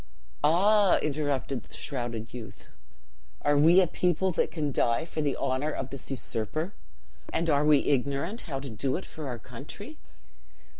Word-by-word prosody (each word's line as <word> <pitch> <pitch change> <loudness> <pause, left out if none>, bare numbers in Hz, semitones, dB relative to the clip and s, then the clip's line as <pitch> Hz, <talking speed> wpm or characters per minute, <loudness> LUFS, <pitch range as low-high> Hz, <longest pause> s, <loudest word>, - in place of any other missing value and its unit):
"'Ah!' 195 +5 +5
interrupted 140 -3 -1
the - - -10
shrouded 120 -4 -4
youth, 120 -3 -9 0.7
'are 145 0 +3
we 165 +6 +7
a 190 - +6
people 180 +2 +1
that - - +1
can 150 -4 -2
die 120 +2 +2
for 160 - -4
the 145 -2 0
honor 130 +4 0
of 135 -3 -4
this 135 -2 -7
usurper, 135 - -3 0.6
and 165 0 +1
are 145 0 +3
we 150 -1 +5
ignorant 140 - 0
how 135 -2 -2
to 135 -2 -6
do 130 +5 -1
it 190 - -7
for 155 -2 -7
our 125 -2 -3
country? 150 - -10
145 Hz, 160 wpm, -28 LUFS, 130-165 Hz, 0.7 s, we